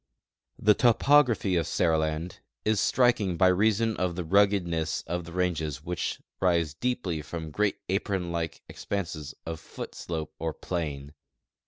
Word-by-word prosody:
The 105 - +5
toi)Ography 120 -5 +4
of 80 - -2
Seriland 80 0 0 0.3
is 110 -1 +2
striking 110 -9 +2
by 95 +2 +5
reason 110 +4 +2
of 90 -2 -1
the 90 - -3
rugged 100 +2 +3
ness 80 -2 -2
of 85 0 -3
tlie 85 +1 -10
ranges 80 -6 -1
which 90 0 -3 0.2
rise 85 -4 +2
steeply 90 -2 -2
from 80 +1 -6
great 105 +5 +1
apron 95 -2 -1
like 85 -1 -3
ex - - -10
]tanses 85 -7 -4
of 80 -1 -4
foot - - -8
slope 80 -2 -5
or 80 -1 -2
plain. 75 -5 -4
90 Hz, 150 wpm, -28 LUFS, 80-100 Hz, 0.3 s, The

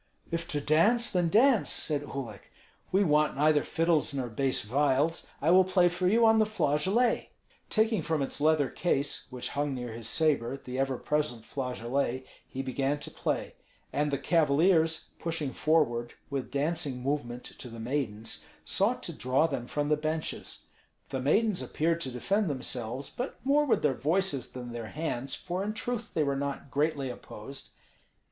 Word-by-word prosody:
"If 165 0 -2
to 150 -4 -2
dance, 205 +12 +3
then 175 -2 +2
dance," 235 +4 +5
said 150 -2 +1
Uhlik. 140 -4 -7 0.4
"We 195 +2 +4
want 150 -3 +3
neither 150 +1 +4
fiddles 165 -3 +1
nor 130 -3 -2
bass 130 +3 0
viols. 145 +7 +1 0.2
I 160 - +4
will 185 +1 +7
play 180 -1 +4
for 180 +1 -1
you 230 +4 +5
on 220 0 +6
the 215 - +5
flageolet." 210 - +1 0.4
Taking 220 -3 +2
from 155 -2 0
its 135 - -5
leather 155 -2 +4
case 145 -1 -1
which 125 -1 -4
hung 145 -1 -1
near 125 -2 -5
his 115 0 -5
sabre 140 -5 +1
the 130 -1 -6
ever 135 -1 0
present 150 -7 -1
flageolet, 130 +1 -2 0.2
he 135 - -5
began 135 +2 -1
to - - -8
play; - - -2 0.4
and 150 +1 +1
the 140 - 0
cavaliers, 160 +2 +3
pushing 160 -5 -2
forward 120 -7 +1 0.2
with 135 -2 -2
dancing 145 -3 -1
movement 125 -3 -2 0.2
to - - -7
the 115 0 -9
maidens, 110 - -3 0.2
sought - - +1
to - - -5
draw 130 +7 +2
them 135 -6 -3
from 145 +2 -1
the 150 - +4
benches. 155 +1 -3 0.4
The 130 - -2
maidens 205 - +2
appeared 165 +2 0
to 135 - -3
defend 160 - 0
themselves, 130 -1 -4
but 250 +3 -4
more 290 +2 +4
with 270 - +2
their 145 -3 +3
voices 155 0 0
than 125 -1 -6
their 115 -1 -5
hands, 140 -2 -3
for 180 +2 -3
in 210 +1 -2
truth 235 0 -3
they 155 - +3
were 140 -1 0
not 140 0 -4
greatly 145 -3 0
opposed. 125 +3 -9
145 Hz, 170 wpm, -29 LUFS, 130-170 Hz, 0.4 s, will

